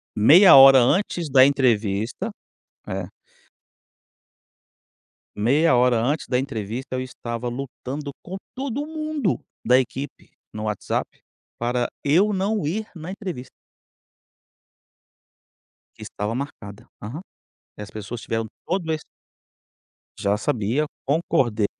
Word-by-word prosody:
Meia 165 Hz, -, +8 dB
hora 135 Hz, 0 st, +10 dB
antes 170 Hz, +4 st, +1 dB
da 130 Hz, -1 st, +7 dB
entrevista, 120 Hz, -, +1 dB, 0.6 s
é 95 Hz, -1 st, -4 dB, 2.3 s
meia 130 Hz, +8 st, +3 dB
hora 125 Hz, -1 st, +4 dB
antes 145 Hz, +7 st, -1 dB
da 125 Hz, -, +1 dB
entrevista 125 Hz, 0 st, -4 dB
eu 130 Hz, -, -2 dB
estava 120 Hz, -1 st, -5 dB
lutando 135 Hz, +3 st, -6 dB
com 185 Hz, -, -8 dB, 0.2 s
todo 275 Hz, +2 st, -3 dB
mundo 310 Hz, -2 st, -2 dB, 0.3 s
da 125 Hz, +2 st, +5 dB
equipe 135 Hz, +2 st, -5 dB, 0.2 s
no 105 Hz, 0 st, -5 dB
WhatsApp, 105 Hz, -2 st, -2 dB, 0.5 s
para 120 Hz, +1 st, 0 dB, 0.2 s
eu 185 Hz, +9 st, +3 dB
não 195 Hz, -3 st, -1 dB
ir 215 Hz, +7 st, -2 dB
na 170 Hz, 0 st, -8 dB
entrevista. 180 Hz, -11 st, -6 dB, 2.5 s
Que -, -, -11 dB
estava 105 Hz, +2 st, -4 dB
marcada. 115 Hz, -6 st, -7 dB
Aham. 120 Hz, +11 st, -6 dB, 0.6 s
E -, -, -8 dB
as 105 Hz, -, -8 dB
pessoas 110 Hz, +2 st, -7 dB
tiveram 115 Hz, 0 st, -2 dB, 0.2 s
todo 170 Hz, -2 st, -1 dB
esse. 155 Hz, -1 st, -3 dB, 1.2 s
Já 100 Hz, +1 st, +1 dB
sabia, 115 Hz, +6 st, 0 dB, 0.2 s
concordei 130 Hz, -7 st, +1 dB
130 Hz, 110 wpm, -23 LUFS, 115-165 Hz, 2.5 s, hora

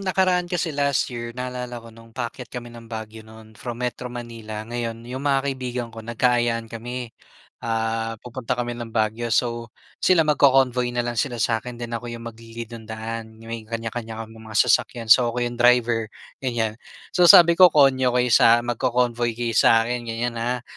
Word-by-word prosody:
nakaraan 185 Hz, -2 st, +1 dB
kasi, 175 Hz, -2 st, -1 dB
last 140 Hz, -2 st, +1 dB
year 120 Hz, 0 st, -6 dB
naalala 125 Hz, -1 st, -5 dB
ko 115 Hz, -, -12 dB
nung 115 Hz, 0 st, -17 dB
paakyat 125 Hz, 0 st, -5 dB
kami 120 Hz, -1 st, -8 dB
ng 115 Hz, -1 st, -12 dB
Baguio 110 Hz, -1 st, -7 dB
no'n 110 Hz, 0 st, -14 dB
from 120 Hz, 0 st, -6 dB
Metro 125 Hz, 0 st, -4 dB
Manila. 115 Hz, -3 st, -7 dB
Ngayon 115 Hz, 0 st, -4 dB
yung 125 Hz, +2 st, -6 dB
mga 135 Hz, -1 st, +3 dB
kaibigan 125 Hz, -2 st, -4 dB
ko 110 Hz, -, -10 dB
nagka-ayaan 120 Hz, 0 st, 0 dB
kami, 120 Hz, +1 st, -6 dB, 0.5 s
ah, 115 Hz, 0 st, -2 dB
pupunta 125 Hz, 0 st, -4 dB
kami 120 Hz, 0 st, -2 dB
ng 120 Hz, -1 st, -6 dB
Baguio. 110 Hz, +1 st, 0 dB
So, 120 Hz, -1 st, 0 dB, 0.3 s
sila 180 Hz, -3 st, +5 dB
magco-convoy 135 Hz, -4 st, +3 dB
na 120 Hz, -, +1 dB
lang 120 Hz, -1 st, -3 dB
sila 120 Hz, -2 st, -1 dB
sa 115 Hz, 0 st, +1 dB
akin 125 Hz, 0 st, -8 dB
then 120 Hz, 0 st, -6 dB
ako 120 Hz, +1 st, -4 dB
yung 115 Hz, 0 st, -8 dB
magli-lead 115 Hz, 0 st, -10 dB
nung 115 Hz, -1 st, -10 dB
daan. 110 Hz, 0 st, -6 dB
May 115 Hz, 0 st, -6 dB
kanya-kanya 115 Hz, 0 st, -5 dB
kaming 110 Hz, 0 st, -14 dB
mga 110 Hz, -, -2 dB
sasakyan. 115 Hz, -2 st, +1 dB
So, 120 Hz, +1 st, +7 dB
ako 120 Hz, +1 st, -1 dB
yung 120 Hz, 0 st, -5 dB
driver, 120 Hz, -2 st, +3 dB, 0.3 s
ganyan. 115 Hz, -4 st, -1 dB, 0.4 s
So, 180 Hz, -, +5 dB
sabi 170 Hz, -4 st, +9 dB
ko 185 Hz, -1 st, +9 dB
konyo 135 Hz, -4 st, +4 dB
kayo 125 Hz, 0 st, +2 dB
sak 115 Hz, +2 st, +6 dB
magco-convoy 120 Hz, -1 st, 0 dB
kayo 120 Hz, -1 st, -2 dB
sa 115 Hz, 0 st, +5 dB
akin 120 Hz, +1 st, -2 dB
ganyan 115 Hz, +1 st, -2 dB
ha? 120 Hz, +1 st, -2 dB
120 Hz, 180 wpm, -23 LUFS, 115-125 Hz, 0.5 s, sabi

